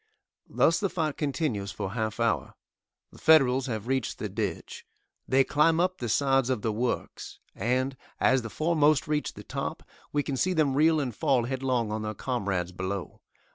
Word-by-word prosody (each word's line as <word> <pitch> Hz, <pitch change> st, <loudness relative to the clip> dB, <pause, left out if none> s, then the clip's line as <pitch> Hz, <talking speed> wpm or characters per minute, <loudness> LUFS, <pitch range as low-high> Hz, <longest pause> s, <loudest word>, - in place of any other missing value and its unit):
Thus 165 Hz, -, +3 dB
the 200 Hz, -, 0 dB
fight 155 Hz, -5 st, -1 dB
continues 135 Hz, -, -2 dB
for 95 Hz, -, -4 dB
half 110 Hz, 0 st, -3 dB
hour. 100 Hz, -, 0 dB, 0.6 s
The -, -, -16 dB
Federals 135 Hz, -4 st, +5 dB
have 110 Hz, -4 st, -3 dB
reached 130 Hz, -2 st, -1 dB
the -, -, -4 dB
ditch. -, -, -4 dB, 0.4 s
They 135 Hz, +1 st, +4 dB
climb 160 Hz, +4 st, +3 dB
up 185 Hz, +1 st, +1 dB
the 120 Hz, -, -3 dB
sides 135 Hz, +1 st, +2 dB
of 125 Hz, -5 st, -1 dB
the 110 Hz, -, +1 dB
works, 120 Hz, +4 st, -3 dB, 0.2 s
and, 130 Hz, +5 st, 0 dB, 0.2 s
as 130 Hz, 0 st, +3 dB
the 115 Hz, -, -6 dB
foremost 155 Hz, +1 st, +2 dB
reach 150 Hz, 0 st, -1 dB
the -, -, -10 dB
top, -, -, -4 dB, 0.3 s
we 145 Hz, 0 st, +1 dB
can 140 Hz, -2 st, -3 dB
see 185 Hz, +7 st, +1 dB
them 155 Hz, -5 st, +2 dB
reel 155 Hz, +3 st, +4 dB
and 130 Hz, -5 st, -2 dB
fall 135 Hz, -6 st, +2 dB
headlong 125 Hz, -3 st, -1 dB
on 110 Hz, 0 st, -2 dB
their 110 Hz, 0 st, -4 dB
comrades 100 Hz, -8 st, -2 dB
below. 95 Hz, +1 st, -5 dB
130 Hz, 175 wpm, -28 LUFS, 110-150 Hz, 0.6 s, Federals